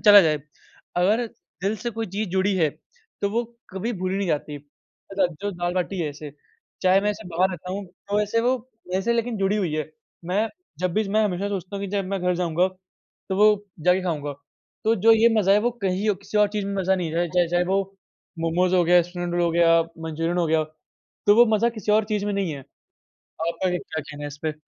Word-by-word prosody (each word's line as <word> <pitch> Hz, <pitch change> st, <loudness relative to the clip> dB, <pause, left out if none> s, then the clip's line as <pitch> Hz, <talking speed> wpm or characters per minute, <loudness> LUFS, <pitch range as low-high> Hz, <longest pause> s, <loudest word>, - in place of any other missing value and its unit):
चला 205 Hz, -1 st, +11 dB
जाए। 155 Hz, -3 st, +2 dB, 0.6 s
अगर 210 Hz, +7 st, +3 dB, 0.4 s
दिल 205 Hz, +3 st, 0 dB
से 240 Hz, +3 st, -4 dB
कोई 225 Hz, 0 st, -4 dB
चीज़ 200 Hz, +2 st, -3 dB
जुड़ी 190 Hz, +2 st, +1 dB
है 160 Hz, -4 st, +3 dB, 0.5 s
तो 200 Hz, -, +2 dB
वो 235 Hz, +3 st, +1 dB, 0.3 s
कभी 200 Hz, +6 st, -3 dB
भूली 185 Hz, -1 st, -2 dB
नहीं 200 Hz, -, -1 dB
जाती। 150 Hz, -1 st, -1 dB
अच्छा, 180 Hz, +6 st, -4 dB
जो 175 Hz, +5 st, -5 dB
दाल-बाटी 175 Hz, +2 st, -2 dB
है 160 Hz, -, 0 dB
ऐसे, 150 Hz, +1 st, -9 dB, 0.5 s
चाहे 185 Hz, +1 st, +5 dB
मैं 205 Hz, +1 st, +1 dB
ऐसे 210 Hz, -1 st, -7 dB
बाहर 180 Hz, +3 st, +2 dB
रहता 180 Hz, 0 st, -6 dB
हूँ 200 Hz, +1 st, -4 dB
तो 200 Hz, +3 st, -3 dB
ऐसे 210 Hz, +2 st, +1 dB
वो 250 Hz, +2 st, +2 dB, 0.3 s
मेरे 185 Hz, +1 st, 0 dB
से 235 Hz, +4 st, +1 dB
लेकिन 235 Hz, 0 st, -1 dB
जुड़ी 195 Hz, +2 st, +1 dB
हुई 185 Hz, -7 st, -1 dB
है। 155 Hz, 0 st, -3 dB, 0.4 s
मैं 205 Hz, +5 st, +1 dB, 0.3 s
जब 180 Hz, -1 st, 0 dB
भी 215 Hz, -1 st, +1 dB
मैं 215 Hz, +2 st, +3 dB
हमेशा 200 Hz, 0 st, -1 dB
सोचता 195 Hz, 0 st, -4 dB
हूँ 200 Hz, -, -4 dB
कि 195 Hz, -, -5 dB
जब 200 Hz, -1 st, 0 dB
मैं 195 Hz, -1 st, -2 dB
घर 180 Hz, 0 st, +2 dB
जाऊँगा 175 Hz, +1 st, +1 dB, 0.6 s
तो 190 Hz, -, -1 dB
वो 210 Hz, +2 st, +7 dB, 0.4 s
जाके 180 Hz, +1 st, +4 dB
खाऊँगा। 150 Hz, -5 st, -2 dB, 0.5 s
तो 225 Hz, -, +4 dB
जो 225 Hz, +3 st, +6 dB
ये 225 Hz, +1 st, +6 dB
मज़ा 195 Hz, -2 st, +4 dB
है 205 Hz, -, +6 dB
वो 245 Hz, -, +3 dB
कहीं 190 Hz, +2 st, 0 dB
और -, -, +1 dB
किसी 205 Hz, +1 st, -2 dB
और 210 Hz, -1 st, +5 dB
चीज़ 205 Hz, -2 st, -1 dB
में 200 Hz, -, -3 dB
मज़ा 190 Hz, +1 st, +2 dB
नहीं 170 Hz, -4 st, -3 dB
है। 175 Hz, +1 st, +1 dB
चाहे 175 Hz, 0 st, +2 dB
चाहे 175 Hz, +1 st, +2 dB
वो -, -, +4 dB, 0.6 s
मोमोज़ 175 Hz, +3 st, +2 dB
हो 180 Hz, -, +5 dB
गया, 175 Hz, +1 st, +6 dB
स्प्रिंग 175 Hz, 0 st, -5 dB
रोल 175 Hz, 0 st, +1 dB
हो 170 Hz, -, +2 dB
गया, 165 Hz, 0 st, +5 dB, 0.3 s
मंचुरियन 165 Hz, +2 st, -1 dB
हो 170 Hz, -, +2 dB
गया 160 Hz, 0 st, +2 dB, 0.6 s
तो 205 Hz, -, +7 dB
वो 240 Hz, +1 st, +8 dB
मज़ा 235 Hz, +3 st, +3 dB
किसी 210 Hz, 0 st, 0 dB
और 215 Hz, 0 st, +4 dB
चीज़ 205 Hz, -1 st, 0 dB
में 205 Hz, -, 0 dB
नहीं 195 Hz, -4 st, 0 dB
है। 140 Hz, -, -6 dB, 0.6 s
आप 165 Hz, +1 st, -5 dB
आगे 180 Hz, -1 st, +1 dB
क्या 160 Hz, -, -5 dB
कहना 145 Hz, 0 st, -9 dB
है 145 Hz, -, -3 dB
इस 145 Hz, 0 st, -10 dB
पे? 155 Hz, -1 st, -1 dB
185 Hz, 230 wpm, -24 LUFS, 175-205 Hz, 0.6 s, चला